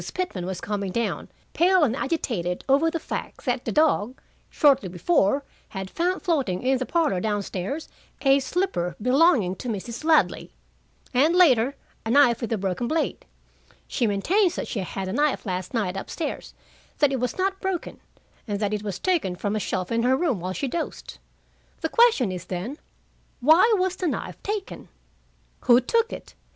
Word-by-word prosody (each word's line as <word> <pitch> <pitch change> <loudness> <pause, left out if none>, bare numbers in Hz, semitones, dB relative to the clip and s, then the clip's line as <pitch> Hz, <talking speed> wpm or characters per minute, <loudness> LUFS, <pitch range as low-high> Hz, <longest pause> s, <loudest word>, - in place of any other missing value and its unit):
Pitman 205 - -3
was 190 -2 -4
coming 200 -2 -3
down, 235 +3 -2 0.2
pale 365 0 +4
and 250 -4 +2
agitated 230 - -2
over 285 +4 +4
the 330 0 -3
fact - - -6
that 250 -1 -1
the - - -1
dog, 270 -6 +2 0.3
shortly 275 - +3
before, 205 - +1 0.3
had 190 -1 -6
found 360 +2 -1
floating 275 - 0
in 260 0 +2
the 255 - -3
parlor 320 - +1
down 205 +1 -1
stairs 200 - -4 0.4
a 275 0 +5
slipper 270 - -1
belonging 250 - +3
to 250 - -7
Mrs. 230 +4 -5
Ladley, 320 0 +2 0.6
and, 295 +7 +3
later, 275 -7 +4 0.3
a 225 - -4
knife 250 -2 +5
with 235 - -3
a 225 - +1
broken 195 +4 -2
blade. 320 +3 -1 0.6
She 240 - 0
maintains 345 - +2
that - - -4
she 220 - -3
had 190 +1 -4
the 185 - -3
knife 290 +1 +1
last 185 -2 -3
night 205 -6 -1
up 195 - -6
stairs, 315 - -5 0.4
that 290 -2 +3
it 265 - -1
was 250 0 -2
not 385 +1 -1
broken, 380 -3 -3 0.5
and 205 -2 -2
that 210 0 -1
it 210 - -1
was 200 -3 -4
taken 325 - 0
from 205 +3 -2
a - - 0
shelf 185 -1 -3
in 230 0 +1
her 255 +2 +3
room 290 - 0
while 185 +2 -4
she 275 - -2
dozed. 330 +6 -5 0.6
The - - -1
question 455 - +4
is, 180 -1 -6
then: 200 - -5 0.6
Why 320 - +6
was 370 0 0
the 365 - -1
knife - - -4
taken? 415 -1 -5 0.8
Who 240 -1 +7
took 460 - +1
it? - - -9
250 Hz, 180 wpm, -25 LUFS, 200-325 Hz, 0.8 s, Who